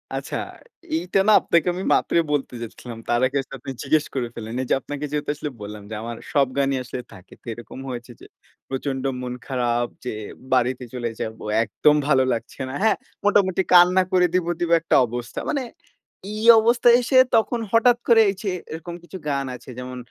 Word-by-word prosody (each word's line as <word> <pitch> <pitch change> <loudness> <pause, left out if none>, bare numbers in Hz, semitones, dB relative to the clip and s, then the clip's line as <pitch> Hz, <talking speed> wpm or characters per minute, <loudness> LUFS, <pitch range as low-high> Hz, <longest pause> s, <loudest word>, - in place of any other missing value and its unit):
আচ্ছা, - - -4 0.6
এইটা 175 +4 0
না, - - +7
আপনাকে 170 0 +2
আমি 185 +2 -4
মাত্র - - +1 0.2
বলতে 145 -3 -1
যাচ্ছিলাম। 115 +1 -9
তার 120 - +2
আগে 140 +2 -1 0.2
আপনি 135 - -7
জিজ্ঞেস 155 -1 +2
করে 125 -3 -1
ফেললেন। 115 0 -7
এই 130 - -4
যে - - +4
আপনাকে 145 0 -5
যেহেতু 150 -1 -2
আসলে 150 0 -5
বললাম 105 0 -7
যে, - - -6
আমার 115 +1 -6 0.2
সব 140 -2 +4
গানই 140 -1 +2
আসলে 125 0 -6
থাকে 95 -2 -15
তো - - -35
এরকম 120 +2 -10
হয়েছে 120 -1 -7
যে, - - -14 0.4
প্রচন্ড 135 0 -3 0.2
মন 125 -1 -4
খারাপ 120 -2 0 0.2
যে 125 - -2 0.4
বাড়িতে 125 0 +1
চলে 120 -2 -2
যাব। 110 - -3 0.3
একদম 150 +5 +3
ভালো 135 -3 +4
লাগছে 115 - -6
না, - - -6
হ্যাঁ? 220 - +3 0.3
মোটামুটি 190 -2 +3
কান্না 180 +1 +7
করে 180 -1 +4
দিব, 185 -2 +2
দিব 175 -1 -1
একটা 165 - +1
অবস্থা। 120 +1 -5
মানে 285 -3 0 0.7
এই 215 +1 -4 0.2
অবস্থায় 235 +1 +5
এসে 255 +2 +2 0.2
তখন 230 +1 +2
হঠাৎ 235 +1 +5
করে 230 -2 +7
এছে 200 +1 -5 0.2
এরকম 165 +2 -6
কিছু 180 +2 -9
গান 140 -1 -1
আছে 125 - -13
যেমন, 125 0 -7
140 Hz, 185 wpm, -23 LUFS, 125-185 Hz, 0.7 s, না